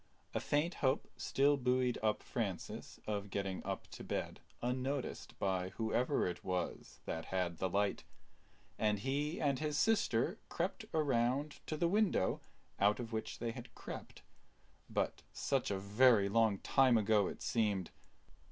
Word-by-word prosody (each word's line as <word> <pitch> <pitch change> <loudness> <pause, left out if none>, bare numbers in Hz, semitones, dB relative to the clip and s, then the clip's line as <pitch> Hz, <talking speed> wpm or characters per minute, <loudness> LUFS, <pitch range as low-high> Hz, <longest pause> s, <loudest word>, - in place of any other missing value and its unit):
A - - +1
faint 150 +4 +1
hope 135 +1 +2
still 140 +1 +3
buoyed 125 -1 +1
up 110 -1 +1
Francis - - -4
of 100 -1 -2
getting 95 -1 -2
up - - -3
to - - -8
bed - - -3 0.2
unnoticed 130 +2 -2
by 95 -2 0
whoever 120 +5 +1
it 90 -1 -3
was 90 -2 -3
that 80 - -3
had 90 -3 -1
the 95 - 0
light; 100 +2 +1 0.8
and 105 -1 +2
he 145 - -1
and 140 -3 +1
his 150 -1 -1
sister 195 - +2
crept 185 +5 -2
around 140 -1 +1
to 155 - -2
the 170 - +2
window 200 - +2 0.4
out 105 +1 +4
of 115 -2 -5
which 110 - -3
they 115 -1 -2
had 120 +1 -10
crept; - - -8 0.7
but - - -1
such - - 0
a 100 - 0
very 105 +2 +5
long 110 -1 +3
time 130 +2 +4
ago 105 -2 +3
it - - -6
seemed. 105 -6 0
115 Hz, 150 wpm, -36 LUFS, 100-140 Hz, 0.8 s, very